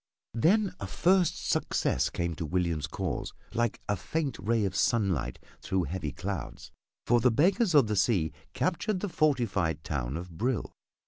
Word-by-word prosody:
Then 185 - +3
a - - -4
first 185 0 +2
success - - +1
came 85 -1 -2
to 85 - -3
William's 85 -4 0
cause - - -3 0.2
like 120 -1 0
a 105 - +1
faint 140 - -3
ray 110 +2 +1
of 95 -1 -2
sunlight 95 - +1 0.2
through 95 -1 0
heavy 80 -2 -3
clouds, - - -5 0.3
for 120 0 +4
the 125 +2 +4
Beggars 180 - +3
of 140 -4 +7
the 105 0 -1
Sea 95 -6 +2 0.2
captured 185 +2 0
the 205 - -2
fortified 100 - +1
town 70 -1 -2
of 90 +1 -7
Brill. 125 +1 -1
110 Hz, 155 wpm, -29 LUFS, -, 0.3 s, of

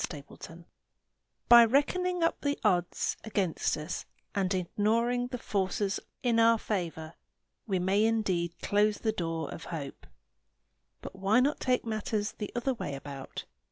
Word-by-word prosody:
GRAY 145 -4 -7
DAYS 165 +1 -11 0.8
By 235 0 +10
reckoning 340 +9 +1
up 330 - +1
the 285 0 0
odds 180 -5 +1
against 195 -8 0
us 155 +3 -5 0.3
and 195 -2 0
ignoring 225 +6 +1
the 250 0 -5
forces 200 -2 -1 0.2
in 235 -2 +3
our 230 0 +6
favor, 165 -7 -3 0.5
we 195 -3 +1
may 190 +4 +2
indeed 185 -7 0
close 210 0 +2
the 220 - 0
door 165 -6 -3
of 165 - -8
hope. 145 -5 -7 1.0
But - - -8
why 195 +5 +3
not 280 +4 +2
take 250 -2 +1
matters 215 -1 -2
the 210 - -6
other 250 +2 0
way 145 - -5
about? 135 -1 -7
205 Hz, 145 wpm, -30 LUFS, 175-230 Hz, 1.0 s, By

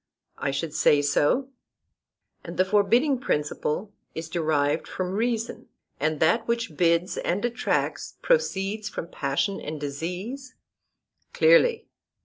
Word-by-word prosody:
I 140 - -1
should 145 +3 -3
say 145 -2 +4
so. 150 - +2 0.9
And - - -8
the 185 - +4
forbidding 230 +8 +3
principle 150 - -2 0.2
is 160 0 -5
derived 155 -4 0
from 185 -1 -3
reason, 230 +2 -2 0.3
and 155 +1 0
that 175 +9 +2
which 235 -8 -1
bids 170 +2 +2
and 195 +7 -1
attracts 240 0 -1
proceeds 210 - 0
from 170 - -6
passion 145 +9 -1
and 155 0 -5
disease? 180 - -5 0.8
Clearly. 475 -1 +4
185 Hz, 120 wpm, -26 LUFS, 155-235 Hz, 0.9 s, say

